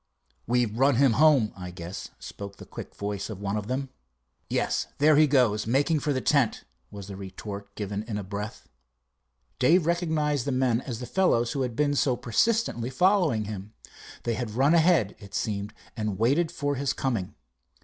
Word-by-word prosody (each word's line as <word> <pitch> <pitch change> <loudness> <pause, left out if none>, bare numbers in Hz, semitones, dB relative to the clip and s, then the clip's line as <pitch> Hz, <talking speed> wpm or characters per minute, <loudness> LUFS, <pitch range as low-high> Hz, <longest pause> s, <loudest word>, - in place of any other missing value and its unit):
"We've 120 -2 +1
run 135 0 +4
him 130 -1 +4
home, 140 -9 +5
I 90 -2 -7
guess," 85 +1 -7
spoke 100 -1 -9
the - - -11
quick - - -9
voice 100 0 -4
of 105 -4 -6
one 100 0 -2
of 105 -1 -3
them. 130 +2 -2 0.6
"Yes, - - 0
there 150 +2 +5
he 155 +1 +6
goes, 120 -7 +2
making 145 +6 +2
for 145 - -1
the 130 - 0
tent," 140 -5 +2 0.3
was 100 -2 -9
the 100 0 -8
retort 100 +1 -8
given 100 -1 -3
in 105 -3 -3
a 105 - -4
breath. 100 +3 -6 0.9
Dave 160 +7 +4
recognized 155 -5 0
the 140 - -1
men 130 -2 +1
as 125 -2 -6
the - - -4
fellows 120 -6 +2
who 140 - -2
had 125 -3 -2
been 145 +2 +2
so 130 -2 +2
persistently 125 - 0
following 170 - +2
him. 105 +1 -7 0.5
They 120 - 0
had 120 0 -3
run 140 +5 +4
ahead, 165 - +3
it 100 -2 -10
seemed, 105 -1 -2 0.2
and 105 -4 -2
waited 140 - +2
for 145 -4 -1
his 140 0 -1
coming. 115 -9 -2
120 Hz, 180 wpm, -27 LUFS, 105-145 Hz, 0.9 s, he